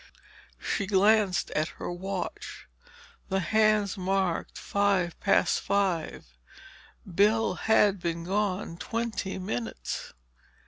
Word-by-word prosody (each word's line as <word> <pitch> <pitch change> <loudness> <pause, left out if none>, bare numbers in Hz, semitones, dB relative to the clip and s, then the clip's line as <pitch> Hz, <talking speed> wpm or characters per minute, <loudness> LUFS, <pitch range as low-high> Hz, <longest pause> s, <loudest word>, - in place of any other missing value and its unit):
She 195 - -2
glanced 200 -1 +3
at 155 +1 0
her - - -4
watch. 185 0 -5 0.6
The 190 - +1
hands 215 0 +2
marked 185 -2 -1
five 200 -4 0
past 200 - +3
five. 190 -5 -1 0.8
Bill 205 +3 +2
had 205 0 +3
been 170 -1 -3
gone 190 -1 -1
twenty 225 -3 -3
minutes. 120 - -4
195 Hz, 95 wpm, -28 LUFS, 175-210 Hz, 0.8 s, glanced